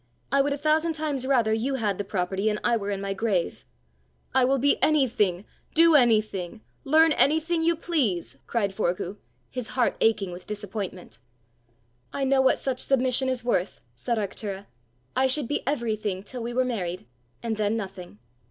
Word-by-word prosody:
I 275 0 +4
would 285 +1 0
a 280 - -1
thousand 310 +3 +1
times 295 -4 -2
rather 235 -5 +3
you 250 +5 -1
had 210 -6 -1
the - - 0
property 195 +1 -1
and 210 0 -2
I 235 - +3
were 205 -3 -3
in 200 -1 -2
my 195 0 -2
grave!" 195 -4 -1 0.7
"I 260 0 +4
will 270 +2 +2
be 280 +2 +3
anything, 225 - +2 0.3
do 330 +1 +7
anything, 215 - +2 0.2
learn 315 +3 +5
anything 320 +3 +3
you 335 +1 +2
please!" 215 - -1
cried 200 -5 -1
Forgue, 185 0 -2 0.3
his 250 -3 -4
heart 250 -2 0
aching 210 -4 +2
with 175 +1 -10
disappointment. 205 - -6 0.9
"I 275 - -3
know 270 0 +3
what 265 - +3
such 260 -2 -2
submission 260 0 +2
is 250 -2 -3
worth!" 195 -6 0 0.2
said 235 - -2
Arctura. 200 -1 -4 0.5
"I 265 +1 +3
should 265 -1 +2
be 290 - -1
everything 215 -8 -2
till 245 +4 -6
we 235 +1 -4
were 255 +1 +1
married, 185 -7 -3 0.4
and 225 -2 -2
then 215 +1 0
nothing! 190 - -7
230 Hz, 170 wpm, -26 LUFS, 200-270 Hz, 0.9 s, do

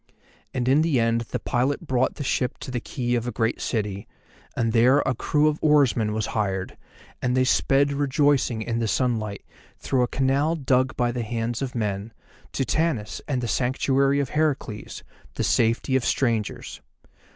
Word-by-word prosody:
And 125 -1 -2
in 140 +4 +4
the 160 -6 +2
end 115 0 +2
the - - -2
pilot 135 +7 -1
brought 130 -3 0
the 145 - -5
ship 125 -1 -1
to - - -6
the 125 - -2
quay 120 +1 -3
of 120 0 -1
a - - -1
great 115 +1 -1
city, 105 -3 -3 0.5
and 115 -1 0
there 125 +5 +5
a 130 - +1
crew 150 +5 +1
of 150 0 0
oarsmen 140 -8 +3
was 110 -1 -1
hired, 95 -3 -2 0.5
and 125 +1 0
they 130 - +4
sped 140 +2 +2
rejoicing 140 -4 +1
in 115 +1 -2
the 115 - 0
sunlight, 110 -4 -1 0.3
through 130 -2 0
a 125 - +2
canal 135 +6 +1
dug 130 -3 +1
by 120 -1 +1
the 120 0 -3
hands 115 +1 -3
of 130 -2 -4
men, 105 -1 -3 0.4
to 135 - -1
Tanis 145 -7 -1
and 130 -4 -1
the - - -1
Sanctuary 135 +3 +1
of 140 -3 -1
Heracles, 145 -8 -2 0.3
the - - -1
Safety 115 +3 +1
of 130 - +2
Strangers. 115 -6 -1
125 Hz, 175 wpm, -24 LUFS, 115-140 Hz, 0.5 s, there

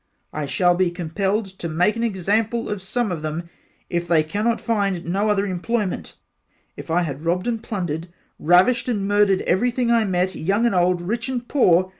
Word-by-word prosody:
I 150 -2 -3
shall 175 +4 +3
be 180 0 +2
compelled 190 +5 -1
to 170 - -4
make 180 +7 +2
an 230 - -3
example 220 +2 0
of 205 -2 -3
some 215 +2 -1
of 165 -3 -3
them 160 +3 -5 0.4
if 175 0 -2
they 160 -2 +4
cannot 210 +9 -1
find 200 -6 -1
no 195 +5 0
other 205 -1 +2
employment 195 +2 -2 0.6
If - - -10
I 175 +2 +2
had 140 -3 -5
robbed 175 +3 0
and 230 -2 -1
plundered 175 -7 -4 0.3
ravished 185 +11 +4
and 200 -5 -1
murdered 205 -2 +3
everything 240 +5 +1
I 230 -2 +3
met 185 -1 0
young 200 +9 0
and 235 - +2
old 180 -1 +2
rich 230 +7 -3
and 245 -2 -3
poor. 185 -9 +3
190 Hz, 185 wpm, -22 LUFS, 175-225 Hz, 0.6 s, they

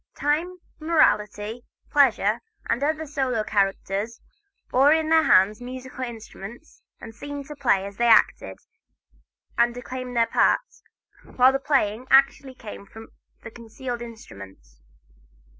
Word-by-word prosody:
Time, 315 +6 -1 0.2
Morality, 225 - +1 0.3
Pleasure, 235 -7 +3 0.3
and 235 +3 -1
other 310 +2 -1
solo 265 -6 -1
characters 200 +2 -1 0.5
bore 270 +3 +5
in 315 0 +2
their 320 0 +5
hands 205 -5 +3
musical 255 +1 -7
instruments 235 +2 -10 0.2
and 225 - -10
seemed 285 +4 -7
to 300 - -9
play 240 -9 +1
as 200 0 -9
they 240 - +2
acted 230 - +3 1.0
and 235 0 +3
declaimed 250 0 -6
their 230 - +4
parts, - - 0 0.5
while 255 +1 +6
the 270 - -1
playing 255 -4 0
actually 270 -1 +3
came 210 -4 -10
from 225 +2 -13 0.3
the 225 - -9
concealed 240 +1 -7
instruments. 95 - -12
240 Hz, 125 wpm, -24 LUFS, 215-275 Hz, 1.0 s, while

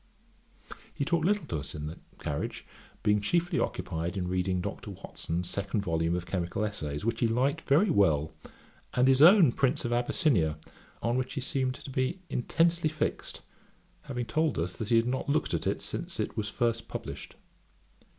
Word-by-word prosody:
He 140 - -2
talked 170 0 +1
little 205 +1 +2
to 80 - -3
us 70 0 -6
in 75 0 -5
the 80 +3 -6 0.2
carriage, 75 -1 -4 0.4
being 105 -1 +3
chiefly 170 +11 +1
occupied 85 +4 -2
in 90 -1 -1
reading 90 0 0
Dr. 90 - -5
Watson's 85 +2 -4
second 100 +3 -2
volume 85 -2 0
of 90 -1 -3
Chemical 90 +3 -1
Essays, 75 -7 -4
which 115 0 0
he 120 - +3
liked 130 +8 +1
very 165 +8 +3
well, 80 - +3 0.6
and 125 +1 +4
his 135 0 +5
own 175 - +8
Prince 135 +2 +1
of 120 - 0
Abyssinia, 120 - +2 0.5
on 120 +2 +1
which 130 +1 -3
he 135 - -2
seemed 130 -1 -1
to 135 - -9
be 130 +8 -1
intensely 165 +5 +2
fixed; 155 0 -3 0.6
having 125 -3 -4
told 155 +6 0
us, 85 +2 -1
that 110 +2 -5
he 120 - +4
had 115 0 +4
not 130 +3 -2
looked 150 +2 +1
at - - -1
it - - 0
since - - -5
it - - -2
was 105 -2 -2
first 115 +1 -1
published. - - -7
115 Hz, 180 wpm, -29 LUFS, 90-140 Hz, 0.6 s, own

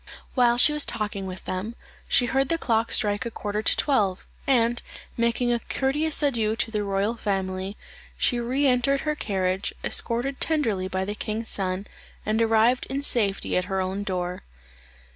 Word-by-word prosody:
While 240 -2 +4
she 300 +5 +5
was 300 -1 +3
talking 210 -4 -2
with 185 0 -8
them, 195 +5 -4 0.3
she 250 - +4
heard 270 +2 +1
the 330 - +2
clock 230 -6 0
strike 205 -1 +3
a 235 - -3
quarter 210 -1 -3
to - - +2
twelve, 205 -10 +1 0.2
and 240 -3 +3 0.3
making 235 +1 +1
a 235 - 0
courteous 295 +6 0
adieu 225 -6 +2
to 225 - -1
the 210 -2 -1
royal 200 +2 0
family, 190 -2 -2 0.4
she 245 - +1
re 255 +4 0
entered 265 +1 +3
her 300 - 0
carriage, 190 -7 -1
escorted 250 +4 -1
tenderly 225 -13 +1
by 190 0 -2
the 205 - -3
king's 220 +1 -3
son, 190 0 -2 0.4
and 215 +2 +1
arrived 225 +2 +3
in 275 +2 -3
safety 210 -8 +1
at 180 - +1
her 190 0 -2
own 190 +2 -2
door. 180 -2 -3
225 Hz, 170 wpm, -25 LUFS, 195-250 Hz, 0.4 s, she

